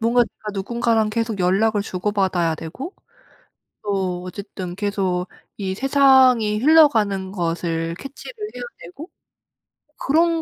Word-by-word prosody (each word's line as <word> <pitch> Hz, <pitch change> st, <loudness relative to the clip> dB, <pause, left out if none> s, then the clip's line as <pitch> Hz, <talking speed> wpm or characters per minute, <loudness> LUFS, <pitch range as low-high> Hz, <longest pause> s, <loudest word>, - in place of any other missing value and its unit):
뭔가 235 Hz, +2 st, +3 dB
내가 215 Hz, -1 st, -9 dB
누군가랑 225 Hz, +2 st, 0 dB
계속 225 Hz, -1 st, -2 dB
연락을 200 Hz, +4 st, +2 dB
주고받아야 185 Hz, -4 st, 0 dB
되고 255 Hz, -, -7 dB, 0.9 s
또 190 Hz, -3 st, -2 dB
어쨌든 185 Hz, -1 st, -7 dB
계속 195 Hz, -3 st, -1 dB, 0.3 s
이 190 Hz, -2 st, -3 dB
세상이 260 Hz, -4 st, +4 dB
흘러가는 220 Hz, -10 st, +4 dB
것을 165 Hz, -2 st, -2 dB
캐치를 275 Hz, -, -9 dB, 0.2 s
해야 -, -, -7 dB, 0.2 s
되고 340 Hz, 0 st, -11 dB, 0.9 s
그런 330 Hz, +3 st, +2 dB
210 Hz, 260 characters per minute, -21 LUFS, 185-245 Hz, 0.9 s, 세상이